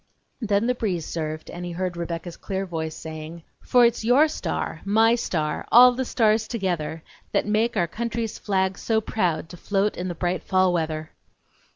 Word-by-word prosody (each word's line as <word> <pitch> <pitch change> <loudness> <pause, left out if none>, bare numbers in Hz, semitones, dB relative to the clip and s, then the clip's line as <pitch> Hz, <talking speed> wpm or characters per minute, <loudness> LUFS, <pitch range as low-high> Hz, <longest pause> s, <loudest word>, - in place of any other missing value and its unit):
Then 210 -1 +1
the 250 - +2
breeze 190 -9 -2
served, 155 -1 -4
and 175 - -7
he 175 -1 -5
heard 180 0 -3
Rebecca's 170 0 -5
clear 195 -1 -4
voice 160 -3 -4
saying: 160 +1 -8 0.2
"For 245 -1 +5
it's 235 -1 +1
your 255 +7 +5
star, 310 - -4
my 220 +3 +4
star, 160 -10 -2
all 250 +1 +9
the 260 +1 -2
stars 220 -2 +2
together, 175 -8 -2 0.3
That - - +2
make 215 +2 +1
our 175 - +3
country's 230 +3 -3
flag 190 -2 0
so 225 -1 +1
proud 180 -7 -1
To 175 - -10
float 200 +3 0
in 180 - -4
the 175 - -4
bright 175 +1 -1
fall 185 -1 +2
weather!" 155 -2 -2
190 Hz, 180 wpm, -24 LUFS, 170-225 Hz, 0.3 s, all